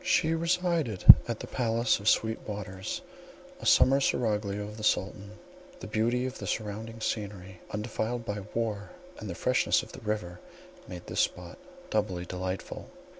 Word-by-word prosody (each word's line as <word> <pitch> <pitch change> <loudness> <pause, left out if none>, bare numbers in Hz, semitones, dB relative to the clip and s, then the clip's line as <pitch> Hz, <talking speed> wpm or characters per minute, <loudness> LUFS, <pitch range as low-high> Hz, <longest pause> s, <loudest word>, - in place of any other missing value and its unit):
She 160 +1 +2
resided 170 - 0 0.2
at - - -3
the - - -5
palace 115 -1 +1
of 100 +2 +2
Sweet 110 0 +1
Waters, 95 -3 -5 0.6
a - - -4
summer 135 +1 +6
seraglio 105 -5 0
of 105 +1 -8
the 110 - -8
Sultan; 100 0 -1 0.5
the - - -8
beauty 120 +3 0
of 130 0 -5
the - - -6
surrounding 110 +1 -4
scenery, 95 -5 -4
undefiled 115 +2 -3
by 105 -1 -3 0.2
war, 110 -3 -2 0.3
and 105 - -7
the 85 - -4
freshness 125 +6 +2
of - - -12
the 130 - -11
river, 105 -5 -3 0.5
made 90 -1 -8
this - - -4
spot - - -1 0.3
doubly 100 -5 -1
delightful. 90 +1 -5
105 Hz, 155 wpm, -29 LUFS, 100-115 Hz, 0.6 s, summer